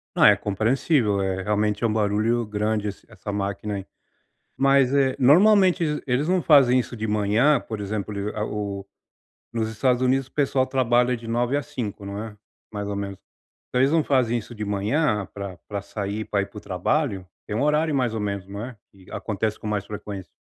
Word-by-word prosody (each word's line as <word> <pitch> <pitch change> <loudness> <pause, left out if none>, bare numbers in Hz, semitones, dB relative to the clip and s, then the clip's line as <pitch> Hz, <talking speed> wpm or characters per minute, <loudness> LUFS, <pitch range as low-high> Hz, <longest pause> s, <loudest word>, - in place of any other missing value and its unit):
Ah, - - +7
é - - +6
compreensível, 110 - +1
eh, 95 0 -1
realmente 105 +2 0
um 110 - +1
barulho 110 +2 +1
grande 105 0 -1
esse 100 - -10
essa 105 - -7
máquina, 100 +1 -3
aí. 95 -1 -5 0.7
Mas, 135 -1 +4
eh, 135 -2 +3
normalmente 185 +5 +5
ele 150 -1 -2
eles 130 +4 0
não 185 0 +2
fazem 130 -5 +6
isso 120 0 -6
de 110 +1 -3
manhã 110 +7 +3
por 110 -2 -6
exemplo, 100 0 -3 0.2
a 105 - -1
o 100 -2 -4 0.7
nos 115 -1 -1
Estados 125 +3 +1
Unidos 130 0 +2
o - - -28
pessoal 135 -2 +1
trabalha 125 -1 +2
de 115 - -11
9 120 +4 +1
às 145 - -3
5 105 -8 -5
não 100 +2 -5
é? 110 -2 -9 0.3
Mais 105 -1 -4
ou 100 - -3
menos. 100 -1 -4 0.5
Se - - -1
eles 135 +3 +4
não 160 -2 +3
fazem 125 -4 +2
isso 120 +1 -7
de 105 -1 -5
manhã 105 +2 0
pra 100 -3 -6
pra 100 -1 -4
sair 100 +1 -4
pra 100 -1 0
ir - - -2
para 105 - -14
o - - -17
trabalho, 100 - -1 0.2
tem 105 - -3
um 125 - +1
horário 150 0 +2
mais 125 -4 +1
ou 110 - -2
menos 100 -2 -3
não 100 +2 -6
é? 125 -2 -8
Que 95 -2 -19
acontece 110 0 -2
com - - -12
mais 105 -2 -1
frequência. 100 -5 -7
110 Hz, 205 wpm, -24 LUFS, 100-130 Hz, 0.7 s, Ah